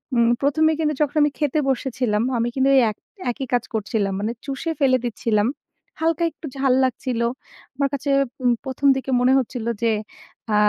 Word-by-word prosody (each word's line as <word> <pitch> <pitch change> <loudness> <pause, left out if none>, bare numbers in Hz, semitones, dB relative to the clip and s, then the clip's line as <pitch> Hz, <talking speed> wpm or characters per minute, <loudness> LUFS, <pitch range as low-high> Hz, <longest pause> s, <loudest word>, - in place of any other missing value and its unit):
উম! 235 -1 +4
প্রথমেই 315 +3 +3
কিন্তু 305 -1 +1
যখন 295 0 +1
আমি 295 -1 +3
খেতে 300 0 +1
বসেছিলাম 250 -5 0 0.2
আমি 235 +1 0
কিন্তু 270 0 +3 0.2
এক 210 - -13 0.3
একই 265 +3 -5
কাজ 245 -2 +2
করছিলাম। 205 -2 -1
মানে 215 +3 -1
চুষে 275 +4 -3
ফেলে 260 -3 +4
দিচ্ছিলাম। 220 -2 0 0.5
হালকা 330 +1 +1
একটু 315 - -12
ঝাল 265 -1 +3
লাগছিল। 250 -1 -1 0.5
আমার 275 +1 +1
কাছে 280 +1 -3 0.6
প্রথম 265 +1 0
দিকে 265 0 -3
মনে 255 +1 +4
হচ্ছিল 245 -2 -2 0.2
যে 230 - +3 0.6
আ - - +4
260 Hz, 165 wpm, -22 LUFS, 235-280 Hz, 0.6 s, উম